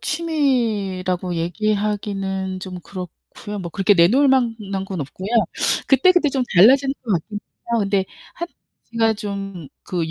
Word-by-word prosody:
취미라고 220 - -1
얘기하기는 195 +1 -2
좀 185 -1 -7
그렇고요. 190 +3 -8
뭐 170 -2 -6
그렇게 195 +3 +3
내놓을 230 +11 +5
만한 225 -7 0
건 190 -4 -4
없고요. 185 +8 -6 0.6
그때그때 330 +4 +4
좀 270 -1 0
달라지는 265 +8 +6
것 225 - -2
같긴 200 +4 -2
해요. 235 +2 -5
근데 195 -1 +1 0.3
한 345 - -5 0.4
제가 225 -1 +3
좀 195 -6 -6
그 170 -3 -3
200 Hz, 285 characters per minute, -21 LUFS, 185-235 Hz, 0.6 s, 달라지는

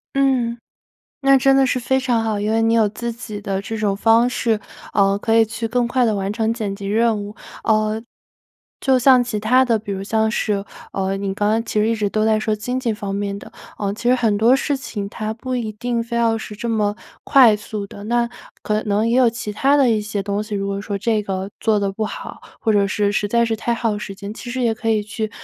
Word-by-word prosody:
嗯， 255 -4 +2 0.6
那 275 -1 +5
真 270 +1 +4
的 270 -1 +4
是 255 - 0
非 265 +2 +1
常 245 -3 +1
好。 215 -2 -1
因 210 +1 -1
为 225 0 +2
你 225 0 +3
有 220 -2 +4
自 235 +3 -4
己 220 -3 -7
的 195 -1 -2
这 225 +2 -5
种 210 -2 0
方 225 +3 +4
式， 230 -3 0 0.4
呃 200 -1 +3
可 225 +2 0
以 225 - +6
去 225 +1 -4
更 240 +1 +1
快 250 +1 +1
地 220 - +1
完 195 0 -2
成 225 0 0
剪 210 -4 -3
辑 200 -1 -7
任 220 0 +1
务。 205 +2 -8 0.3
嗯 215 0 +1 0.8
就 265 -2 +3
像 255 0 +6
其 240 -3 -3
他 250 +5 +4
的， 235 -3 +2
比 205 -1 -6
如 195 0 -4
像 220 +2 +1
是 205 -3 -1 0.3
呃 195 0 -1
你 195 -1 -2
刚 205 +1 0
刚 225 +1 +1
其 220 - -2
实 210 - +3
一 230 - +2
直 210 -2 -1
都 215 0 +1
在 220 -1 +3
说 215 0 0
经 250 +4 -3
济 240 -3 0
方 200 -1 -4
面 200 0 -3
的， - - -12 0.3
呃 200 -1 -1
其 240 +3 -2
实 250 - +6
很 225 -5 +1
多 235 +5 +5
事 285 +1 -1
情 230 -6 -5
它 215 0 -4
不 255 +2 -5
一 230 -3 -2
定 235 +2 -2
非 235 0 -4
要 230 -1 +2
是 210 -1 -8
这 235 - -5
么 210 -2 0 0.3
快 250 -6 +6
速 210 -1 -5
的， 200 - -11
那 235 +2 +1 0.3
可 215 0 0
能 210 +1 +1
也 230 +1 +2
有 250 -2 +6
其 225 -2 -5
他 275 +7 +3
的 275 -3 +4
一 220 -2 +2
些 210 -1 -3
东 200 +1 -2
西， 215 0 -6
如 195 0 -2
果 200 0 -2
说 205 -1 -4
这 215 0 +1
个 195 -1 -3
做 220 -2 +2
得 200 -1 -1
不 215 +2 -2
好， - - -8 0.2
或 220 - +1
者 200 -1 +3
是 205 +1 0
实 205 0 0
在 235 +2 +3
是 225 -1 0
太 235 +2 -2
耗 225 -3 -1
时 200 -1 -6
间， 200 +1 -7
其 240 - -8
实 255 +1 -2
也 230 -2 +2
可 225 - -4
以 215 -1 +2
去 215 +1 -4
220 Hz, 270 characters per minute, -20 LUFS, 205-235 Hz, 0.8 s, 以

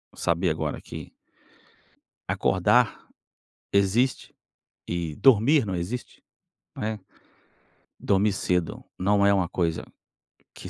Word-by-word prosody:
saber 85 +2 0
agora 80 -1 -3
que - - -9 1.2
acordar - - +2 0.6
existe 100 +6 +1 0.5
e 85 -3 -3
dormir 135 - +4
não 95 -2 -3
existe, 90 +9 -5 0.5
né, 110 0 -3 1.0
dormir 100 +1 +2
cedo 90 -3 -1
não 100 +2 +2
é 100 - +5
uma 95 -3 +1
coisa 85 -2 -1 0.7
que - - -10
95 Hz, 95 wpm, -25 LUFS, 85-105 Hz, 1.2 s, é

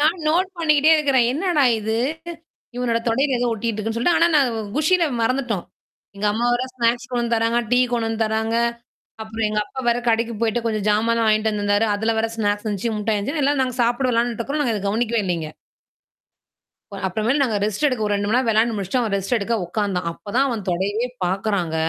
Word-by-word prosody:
நான் 315 +4 +3
நோட் 360 +4 +2
பண்ணிக்கிட்டே 305 -2 +4
இருக்கிறேன். 275 -5 +3
என்னடா 325 0 +1 0.2
இது? 220 +1 -2 0.8
இவனோட 240 -2 0
தொடையில 265 +3 +1
ஏதோ 245 - 0
ஒட்டிக்கிட்டு 225 0 -3
இருக்குன்னு 225 +2 -3
சொல்லிட்டு. 335 +8 +2
ஆனா 335 - +5
நான் 275 -4 +4 0.3
குஷியில 335 +4 +3 0.2
மறந்துட்டோம். 235 -6 -1 0.5
எங்க 210 - -1
அம்மாவேரா 240 +3 0
ஸ்நாக்ஸ் 240 +1 0
கொண்டந்து 235 -1 0
தராங்க. 230 +1 +1
டீ 245 - +4
கொண்டந்து 225 -1 -1
தராங்க. 220 +1 -1 0.7
அப்புறம் 220 0 -2
எங்க 210 - -1
அப்பா 265 - -7
வேற 235 0 +3
கடைக்கு 230 +1 +1
போய்ட்ட 230 +1 +1
கொஞ்சம் 215 -2 -1
ஜாமானா 230 +2 +2
வாங்கிட்டு 215 0 +2
வந்தருந்தாரு. 205 +1 +1
அதல 220 +2 0
வேற 225 +1 +1
ஸ்நாக்ஸ் 205 0 -1
எந்தச்சு, 210 +3 -2
முட்டாய் 210 0 0
இந்தச்சு 285 +8 -2
எல்லார 280 0 +2
நாங்க 255 -1 -3
சாப்படோம் 245 +2 +1
வேளான்ட்டு 235 0 0
இருக்கறோம். 285 +6 -1
நாங்க 235 -5 0
இத 200 - -5
கவனிக்கவே 225 +1 0
இல்லைங்க. 165 -4 -2 1.6
அப்புறமேல 220 +9 0
நாங்க 230 -5 0
ரெஸ்ட் 215 +7 0
எடுக்க 255 -6 0
ஒரு 205 - 0
2 205 0 -2
மணி 225 - +2
நேர 255 -1 0
விளையாண்டு 225 +1 +2
முடிச்சுட்டு, 200 +5 -1
அவன் 220 -4 -2
ரெஸ்ட் 195 +5 -1
எடுக்க 225 +2 -2
உட்காந்தான். 185 -1 -2
அப்பதான் 235 +10 -1
அவன் 230 -6 -3
தொடயவே 200 +7 -1 0.2
பார்க்குறாங்க. 190 -3 -1
230 Hz, 185 wpm, -21 LUFS, 210-250 Hz, 1.6 s, ஆனா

